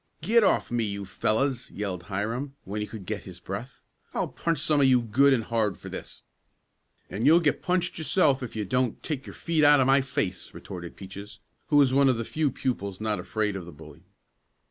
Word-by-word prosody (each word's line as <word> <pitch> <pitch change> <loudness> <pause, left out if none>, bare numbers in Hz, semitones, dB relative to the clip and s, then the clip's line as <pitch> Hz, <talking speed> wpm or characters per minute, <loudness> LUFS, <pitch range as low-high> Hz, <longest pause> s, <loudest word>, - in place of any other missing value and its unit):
"Get 230 +1 +4
off - - +2
me, 120 -1 +1
you 100 -1 -3
fellows!" 120 +7 0
yelled 100 -4 -4
Hiram, 115 +8 -3
when 105 +3 -4
he 105 - -3
could 110 -5 -9
get 105 +1 -3
his 90 -2 -11
breath. 105 +8 -7 0.3
"I'll - - 0
punch 165 -1 -1
some 145 +1 +2
of 135 - +6
you 130 -1 +5
good 120 +5 +3
and 125 -4 +2
hard 110 -3 0
for - - -9
this!" - - -7 0.8
"And 110 +7 -1
you'll 165 +3 +7
get 150 -4 +1
punched 180 -1 -1
yourself 155 -4 +2
if 125 -3 -6
you 105 -1 -2
don't 125 +3 -1
take 145 -4 -4
your - - -9
feet 165 -2 0
out 145 -1 +7
of 130 - +4
my 135 +1 +5
face!" 110 -11 -3
retorted 90 0 -8
Peaches, 100 +2 -9 0.3
who 150 - +1
was 140 -3 +5
one 140 0 +5
of 125 - +2
the 115 - -3
few 155 +3 0
pupils 100 -7 -3
not 110 -2 -1
afraid 105 +3 -1
of 90 -3 -6
the - - -8
bully. 75 - -14
115 Hz, 210 wpm, -27 LUFS, 100-140 Hz, 0.8 s, you'll